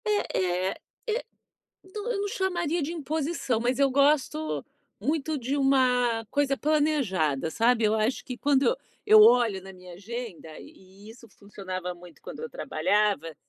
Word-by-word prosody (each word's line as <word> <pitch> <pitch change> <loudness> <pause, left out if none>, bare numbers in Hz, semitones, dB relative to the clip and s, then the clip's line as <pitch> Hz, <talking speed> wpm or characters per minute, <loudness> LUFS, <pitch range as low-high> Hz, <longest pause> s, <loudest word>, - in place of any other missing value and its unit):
É 185 - 0
é - - -7 0.3
é 455 +3 -1 0.6
do 415 +5 -5
eu 400 - -2
não 410 - -1
chamaria 350 -4 -1
de 295 +3 -3
imposição, 310 -5 -2
mas 245 +2 0
eu 275 -1 +4
gosto 255 - +1 0.3
muito 300 +6 -1
de 260 +2 -2
uma 250 -4 +2
coisa 275 -1 +1
planejada, 255 - 0
sabe. 230 +3 +2
Eu 215 0 +3
acho 220 +4 0
que 250 -2 -6
quando 280 0 +2
eu 475 - +3 0.3
eu 430 +1 +9
olho 235 - +5
na 190 +1 -11
minha 180 -1 -13
agenda, 200 -5 -8
e - - -11 0.4
e - - -11
isso 230 +1 -14
funcionava 185 -3 -7
muito 175 -1 -16
quando - - -9
eu 470 - -5
trabalhava, 205 - 0
250 Hz, 160 wpm, -27 LUFS, 195-305 Hz, 0.6 s, eu